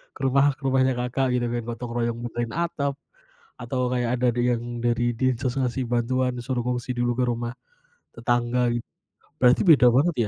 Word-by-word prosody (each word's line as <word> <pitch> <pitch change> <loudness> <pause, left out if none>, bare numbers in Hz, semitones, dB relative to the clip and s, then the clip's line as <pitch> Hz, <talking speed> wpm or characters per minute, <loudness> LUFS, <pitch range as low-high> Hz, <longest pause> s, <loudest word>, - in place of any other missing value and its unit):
ke - - -12
rumah, 140 +1 +3
ke - - -29
rumahnya 130 0 +3
Kakak 125 +2 0
gitu 120 -1 0
kan. 120 0 -2
Gotong 120 0 -5
royong 120 -1 -1
benerin 120 -1 -4
atap, 160 -4 -1 0.7
atau 125 +2 -3
kayak 120 -2 0
ada 125 - +2
di 120 - -2
yang 120 -1 -2 0.2
dari 120 0 +1
Dinsos 130 -1 0
ngasih 130 0 -1
bantuan, 125 +1 0
suruh 125 0 -2
ngungsi 125 0 -2
dulu 120 0 +1
ke 125 - +3
rumah 120 0 -2 0.6
tetangga, 120 +1 +1 0.7
berarti 125 0 +5
beda 155 -8 +6
banget 150 +8 +3
125 Hz, 170 wpm, -24 LUFS, 120-130 Hz, 0.7 s, beda